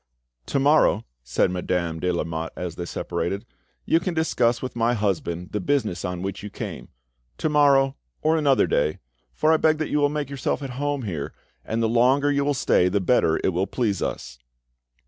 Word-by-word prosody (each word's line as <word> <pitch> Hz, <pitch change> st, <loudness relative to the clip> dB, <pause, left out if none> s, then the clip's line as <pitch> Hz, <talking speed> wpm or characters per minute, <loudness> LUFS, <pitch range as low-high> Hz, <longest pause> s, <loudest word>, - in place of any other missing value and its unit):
"To -, -, 0 dB
morrow," 140 Hz, -6 st, +4 dB, 0.2 s
said 60 Hz, +9 st, +1 dB
Madame 90 Hz, -2 st, -2 dB
de 90 Hz, +2 st, 0 dB
Lamotte 80 Hz, -1 st, -3 dB
as 90 Hz, -2 st, -4 dB
they 85 Hz, +1 st, -5 dB
separated, 100 Hz, +4 st, -3 dB, 0.4 s
"you 165 Hz, -, +3 dB
can 175 Hz, 0 st, -3 dB
discuss 125 Hz, -7 st, +1 dB
with 130 Hz, -, -6 dB
my 120 Hz, +1 st, +2 dB
husband 90 Hz, -4 st, -2 dB
the 105 Hz, -, -1 dB
business 110 Hz, -6 st, -1 dB
on 90 Hz, 0 st, -3 dB
which 95 Hz, 0 st, -4 dB
you 105 Hz, -, -6 dB
came: -, -, -7 dB, 0.5 s
to 155 Hz, -, 0 dB
morrow, 140 Hz, -2 st, +4 dB, 0.3 s
or 155 Hz, +1 st, +3 dB
another 145 Hz, -4 st, +3 dB
day, 75 Hz, -, +1 dB, 0.3 s
for 155 Hz, -, +2 dB
I -, -, +5 dB
beg 155 Hz, 0 st, +3 dB
that 155 Hz, -1 st, -2 dB
you 150 Hz, -, +2 dB
will 145 Hz, 0 st, +3 dB
make 145 Hz, -2 st, -3 dB
yourself 140 Hz, +1 st, -2 dB
at 135 Hz, -, -5 dB
home 145 Hz, -2 st, -1 dB
here, 80 Hz, -9 st, -4 dB, 0.3 s
and 115 Hz, +1 st, -2 dB
the -, -, +3 dB
longer 130 Hz, +5 st, +3 dB
you 140 Hz, 0 st, +1 dB
will 145 Hz, 0 st, +1 dB
stay 90 Hz, -6 st, +3 dB
the 100 Hz, -, +1 dB
better 95 Hz, -5 st, +2 dB
it -, -, +3 dB
will 95 Hz, +2 st, -1 dB
please 110 Hz, -6 st, -1 dB
us." -, -, -4 dB
115 Hz, 195 wpm, -24 LUFS, 90-145 Hz, 0.5 s, I